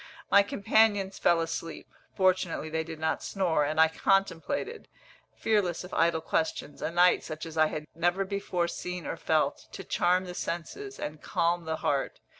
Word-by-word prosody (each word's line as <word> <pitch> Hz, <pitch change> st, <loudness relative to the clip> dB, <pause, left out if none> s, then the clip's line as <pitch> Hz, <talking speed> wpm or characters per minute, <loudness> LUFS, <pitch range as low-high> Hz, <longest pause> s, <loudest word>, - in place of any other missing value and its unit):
My 200 Hz, -, +8 dB
companions 200 Hz, -1 st, +2 dB
fell 170 Hz, -1 st, +3 dB
asleep 165 Hz, 0 st, -5 dB, 0.3 s
fortunately 185 Hz, -4 st, +1 dB
they 160 Hz, 0 st, -1 dB
did 160 Hz, 0 st, -8 dB
not 160 Hz, 0 st, -1 dB
snore; 175 Hz, -6 st, 0 dB
and 155 Hz, +2 st, -1 dB
I 160 Hz, -, +8 dB
contemplated, 195 Hz, -, 0 dB, 0.5 s
fearless 200 Hz, -7 st, 0 dB
of 180 Hz, -, -10 dB
idle 165 Hz, -1 st, +2 dB
questions, 160 Hz, -2 st, -2 dB
a -, -, -1 dB
night 175 Hz, +2 st, +4 dB
such 155 Hz, +1 st, -6 dB
as 165 Hz, -1 st, -8 dB
I 155 Hz, -1 st, +4 dB
had 150 Hz, 0 st, -5 dB
never 175 Hz, +4 st, +1 dB
before 190 Hz, -3 st, -1 dB
seen 180 Hz, 0 st, -5 dB
or -, -, -3 dB
felt, 155 Hz, -3 st, 0 dB
to -, -, -7 dB
charm 180 Hz, +1 st, +1 dB
the 180 Hz, -, -6 dB
senses, 400 Hz, -, -5 dB
and 150 Hz, 0 st, -5 dB
calm 170 Hz, 0 st, 0 dB
the 160 Hz, 0 st, -1 dB
heart. 140 Hz, -2 st, 0 dB
175 Hz, 170 wpm, -29 LUFS, 160-190 Hz, 0.5 s, My